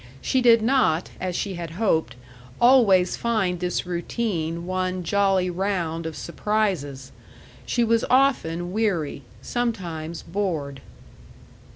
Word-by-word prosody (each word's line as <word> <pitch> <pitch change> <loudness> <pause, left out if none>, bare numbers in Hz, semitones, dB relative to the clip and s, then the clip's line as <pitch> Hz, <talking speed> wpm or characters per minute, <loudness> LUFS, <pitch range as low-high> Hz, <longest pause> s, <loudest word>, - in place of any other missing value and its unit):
She 260 - +1
did 230 -2 +5
not, 225 -10 +2
as 180 -1 -3
she 200 +1 -2
had 170 -2 -6
hoped, 160 - +1 0.4
always 215 -8 +5
find 205 -7 0
this 180 0 -2
routine 170 -2 -3
one 185 0 -2
jolly 195 0 +2
round 170 -3 -2
of 160 - -6
surprises. 170 -10 -2 0.6
She 240 - +1
was 230 0 +2
often 180 -11 +2
weary, 185 -10 -1 0.2
sometimes 175 -9 -3
bored. 165 -7 -3
185 Hz, 110 wpm, -24 LUFS, 165-220 Hz, 0.6 s, did